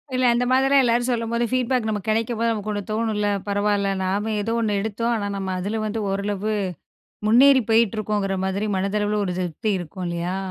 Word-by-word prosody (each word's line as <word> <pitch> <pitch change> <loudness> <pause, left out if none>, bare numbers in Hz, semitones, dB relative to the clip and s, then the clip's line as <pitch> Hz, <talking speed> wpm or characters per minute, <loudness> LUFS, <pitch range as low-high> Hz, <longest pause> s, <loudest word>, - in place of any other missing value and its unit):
இல்ல, 255 - +1
அந்த 245 +1 +1
மாதிரிலாம் 270 +1 +4
எல்லாரும் 240 +1 +1
சொல்லும்போது 235 0 0
ஃபீட்பேக் 250 -2 +1
நமக்கு 215 0 -3
கிடைக்கும் 225 +1 0
போது 230 0 +2
நமக்கு 215 -1 -3
ஒண்ணு 205 0 -2
தோணும்ல. 215 -2 0 0.2
பரவால்ல, 205 0 +1
நாம 205 +4 -1
எதோ 225 +3 -2
ஒண்ணு 210 -2 0
எடுத்தோம். 230 +3 -1
ஆனா 205 -2 -2
நம்ம 190 -1 -3
அதுல 215 +4 -2
வந்து 215 +1 -2
ஓரளவு 205 +2 -2 0.8
முன்னேறி 260 +3 +6
போயிட்டுருக்கோங்கிற 210 -3 +1
மாதிரி 195 +2 -1
மனதளவுல 205 +2 0
ஒரு 180 - -2
திருப்தி 180 +4 -2
இருக்கும் 180 +1 -6
இல்லையா? 170 +2 -2
215 Hz, 170 wpm, -23 LUFS, 200-230 Hz, 0.8 s, முன்னேறி